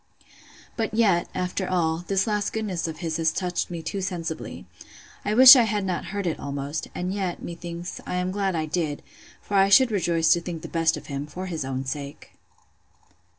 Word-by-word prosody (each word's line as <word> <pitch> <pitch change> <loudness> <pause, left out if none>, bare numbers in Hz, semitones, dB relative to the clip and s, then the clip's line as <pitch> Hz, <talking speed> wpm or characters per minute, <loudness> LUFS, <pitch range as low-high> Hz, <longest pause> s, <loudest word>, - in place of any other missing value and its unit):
But 220 -2 -2
yet, 200 -7 +3
after 180 +1 -2
all, 165 -3 +1
this 195 -1 +1
last 210 -2 -1
goodness 195 -7 -2
of 160 0 -7
his 160 -1 -1
has 160 -1 +2
touched 180 -1 -2
me 170 -2 -6
too 200 +3 -3
sensibly. 170 -4 -5 0.6
I 210 +1 -1
wish 260 +3 +11
I 255 - +6
had 210 -3 0
not 185 -2 -2
heard 200 -1 -4
it, 170 - -2
almost; 140 +2 -4
and 180 +1 -2
yet, 190 -3 -3
methinks, 170 +1 -7
I - - -3
am 180 0 -1
glad 195 -2 -1
I 160 -1 -1
did; 155 -2 -2 0.4
for - - -9
I 195 0 +5
should 255 +3 +6
rejoice 170 -5 +3
to 170 - -1
think 170 -2 -6
the - - -5
best 165 -1 +1
of - - -10
him, 140 0 -5
for 180 +5 -6
his 165 -5 -4
own 130 0 -4
sake. 140 +1 -6
175 Hz, 195 wpm, -25 LUFS, 160-195 Hz, 0.6 s, wish